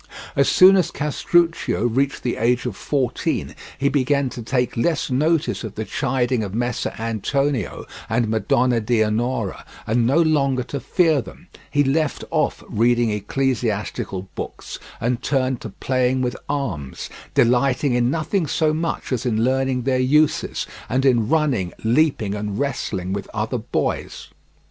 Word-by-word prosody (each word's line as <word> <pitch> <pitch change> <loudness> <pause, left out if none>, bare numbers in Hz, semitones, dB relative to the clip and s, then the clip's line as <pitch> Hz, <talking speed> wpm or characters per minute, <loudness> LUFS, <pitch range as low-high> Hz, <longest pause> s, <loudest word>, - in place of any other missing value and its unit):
As 140 - +3
soon 190 +1 +7
as 180 - +2
Castruccio 165 -3 +1
reached 135 +4 0
the 120 - -1
age 120 +1 +1
of - - -3
fourteen 135 -5 -1 0.2
he 140 - +1
began 140 -1 +1
to 120 - -7
take 125 +2 -1
less 140 +3 0
notice 155 +4 +1
of 110 -2 -6
the 110 - -3
chiding 130 -2 0
of 100 0 -5
Messer 120 0 -1
Antonio 115 +2 -1 0.2
and 115 +1 +1
Madonna 120 +2 +2
Dianora 110 -1 0 0.2
and 115 +1 +2
no 135 +5 +3
longer 140 -5 +2
to 140 +3 -5
fear 160 -2 +2
them; - - -13 0.2
he 145 - +2
left 145 +2 0
off - - 0
reading 120 +1 +2
ecclesiastical 105 -4 -2
books, - - -7 0.2
and 120 +1 -1
turned 130 -2 0
to 110 - -6
playing 130 +4 0
with 125 0 -1
arms, 100 - -3 0.3
delighting 125 +3 +3
in 120 0 +2
nothing 165 +4 0
so 155 +2 +1
much 165 -1 -3
as 125 -4 -1
in 115 -3 +1
learning 130 0 +1
their 130 0 +1
uses, 145 +4 +2 0.2
and 130 +2 +1
in 120 -4 +3
running, 135 - +1
leaping, 115 -4 +2
and 105 -1 -3
wrestling 95 -9 -2
with 100 -1 -4
other - - -1
boys. - - -3
125 Hz, 150 wpm, -22 LUFS, 115-140 Hz, 0.3 s, soon